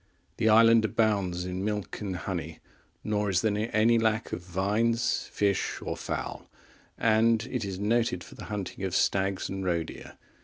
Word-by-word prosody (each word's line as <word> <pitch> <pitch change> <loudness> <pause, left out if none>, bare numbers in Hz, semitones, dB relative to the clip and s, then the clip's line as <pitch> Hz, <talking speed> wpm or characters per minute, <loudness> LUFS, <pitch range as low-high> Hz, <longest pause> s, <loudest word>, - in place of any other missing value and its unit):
The 110 -1 +2
island 115 +1 +6
abounds 100 -5 +1
in 90 +1 -3
milk 105 0 -3
and 100 -3 -3
honey, 85 - -4 0.5
nor 105 -1 0
is 90 -2 +2
there 110 +1 0
any 115 +2 +4
lack 110 0 0
of - - -3
vines, 105 +7 0
fish, 100 -2 0
or - - -4
fowl; - - -5 0.5
and 115 0 +3
it 125 -3 -2
is 95 -2 -4
noted 105 -3 0
for - - -13
the - - -9
hunting 100 -2 -5
of 95 -1 -2
stags 95 0 +1
and 95 0 -4
roe 85 -3 +1
deer. - - -11
105 Hz, 165 wpm, -28 LUFS, 95-110 Hz, 0.5 s, island